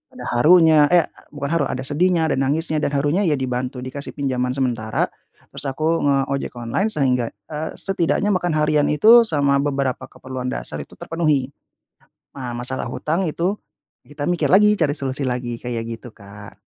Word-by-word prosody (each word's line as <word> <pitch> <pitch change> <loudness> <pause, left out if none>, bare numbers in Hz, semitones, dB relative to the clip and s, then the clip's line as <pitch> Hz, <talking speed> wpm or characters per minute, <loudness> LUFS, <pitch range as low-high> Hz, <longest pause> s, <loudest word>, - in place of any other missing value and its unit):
ada 250 - -8
harunya, 155 +1 +6
eh 175 -2 +5 0.2
bukan 140 -1 -5
haru, 165 -4 +2
ada 130 - -3
sedihnya, 165 +3 +2
ada 160 - +1
nangisnya 155 +3 0
dan - - 0
harunya 145 +7 +1
ya 155 - +3
dibantu 130 0 -3
dikasih 135 +2 -7
pinjaman 130 -3 -1
sementara, 120 -5 0 0.5
terus - - -6
aku 155 +5 0
nge-ojek 140 -1 0
online 120 - -1
sehingga 125 - +1
eee, 150 +11 -7
setidaknya 195 +2 +1
makan 175 -3 0
harian 150 -1 +2
itu 220 +10 +7
sama 140 -5 +2
beberapa 140 -2 -2
keperluan 130 -1 -7
dasar - - -4
itu - - -13
terpenuhi. 150 -5 0 0.9
Nah, 125 -3 -5
masalah 125 +2 -3
hutang 160 +9 -2
itu 175 +6 -1 0.5
kita 145 0 -5
mikir 175 - +1
lagi 210 +2 +6
cari 150 -4 +2
solusi 135 -1 -3
lagi, 125 -1 -3
kayak 120 -1 -4 0.2
gitu, 120 0 -12
Kak. 100 0 -13
140 Hz, 160 wpm, -21 LUFS, 130-160 Hz, 0.9 s, itu